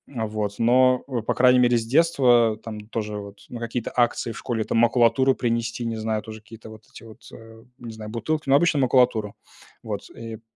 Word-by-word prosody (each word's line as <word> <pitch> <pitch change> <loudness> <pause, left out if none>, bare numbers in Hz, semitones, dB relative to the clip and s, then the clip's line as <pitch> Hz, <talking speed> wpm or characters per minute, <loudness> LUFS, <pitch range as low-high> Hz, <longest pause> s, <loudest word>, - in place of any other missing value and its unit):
а 110 -2 -2
вот. 105 -1 -4
Но, 125 +2 +4
по 120 -5 -3
крайней 125 0 +5
мере, 120 -1 +3
с 115 - -3
детства 125 -5 +3
там 110 -2 -7
тоже 105 -2 -4
вот 100 0 -10
на 120 - -7
какие-то 115 0 -4
акции 120 -1 +1
в - - -9
школе 115 -2 -3
там - - -2
макулатуру 120 +3 +3
принести, 115 0 -2
не 115 -1 -3
знаю, 110 -1 -2
тоже 110 0 -9
какие-то 110 +1 -13
вот 110 0 -13
эти - - -13
вот, 110 -1 -15
э, 115 0 -14 0.2
не 120 -1 -8
знаю, 110 -1 -9
бутылки, 150 +7 -3
ну, 135 - +5
обычно 155 0 +3
макулатуру. 125 -5 +2 0.5
Вот - - -6
и 115 -1 -9
пэ - - -25
115 Hz, 205 wpm, -23 LUFS, 110-125 Hz, 0.5 s, крайней